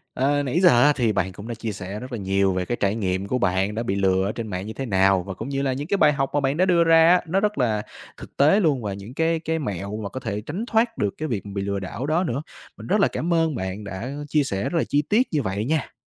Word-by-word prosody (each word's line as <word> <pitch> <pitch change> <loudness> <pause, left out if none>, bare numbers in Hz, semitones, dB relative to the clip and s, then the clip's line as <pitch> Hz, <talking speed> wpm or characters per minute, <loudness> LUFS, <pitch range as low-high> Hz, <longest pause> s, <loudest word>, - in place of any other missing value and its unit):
Ờ, 145 +2 +1
nãy 140 +5 0
giờ 180 - +7
á 145 +2 +5
thì 115 -4 +1
bạn 95 -2 -1
cũng 100 +5 -10
đã 120 - -4
chia 110 0 -4
sẻ 100 +1 -6
rất 125 +1 -9
là 120 - -3
nhiều 95 -1 +1
về 90 0 -2
cái 120 - -2
trải 100 +1 +1
nghiệm 95 -2 -2
của 125 +5 0
bạn 95 0 0
đã 115 - -2
bị 100 -4 -1
lừa 95 -1 +2
ở 100 - -1
trên 115 0 -5
mạng 95 -1 -4
như 110 - -5
thế 135 - -5
nào, 95 -3 +3
và 95 - -6
cũng 110 +8 -7
như 135 0 -1
là 135 -2 0
những 145 +4 -5
cái 200 - +1
bài 150 -3 +5
học 135 -1 -1
mà 145 - +2
bạn 140 +1 0
đã 185 - +4
đưa 175 -2 +4
ra 165 0 +6
á, 180 +1 +5
nó 185 +4 +1
rất 210 +1 0
là 110 -5 +1 0.4
thực - - -12
tế 150 +9 +5
luôn 150 - +2
và 105 -3 -3
những 100 +5 -9
cái 165 +3 +1
cái 160 0 -2
mẹo 100 - -4
mà 105 -2 -5
có 130 - -6
thể 105 -4 -4
tránh 165 - -5
thoát 230 0 +1
được 100 -1 0
cái 155 - -3
việc 110 -8 -3
bị 100 -1 -4
lừa 100 0 -2
đảo 100 +7 -5
đó 160 +5 +1
nữa. 135 -3 -2 0.4
Mình - - -10
rất 205 +4 +2
là - - +5
cảm 170 +2 -2
ơn 165 -3 +1
bạn 95 0 -4
đã 100 +5 -6 0.2
chia 150 0 +3
sẻ 100 -7 -3
rất 170 - -1
là - - +2
chi 145 - +1
tiết 215 - +2
như 150 - +1
vậy 100 -1 -2
nha. 155 +2 -1
120 Hz, 305 wpm, -23 LUFS, 100-155 Hz, 0.4 s, giờ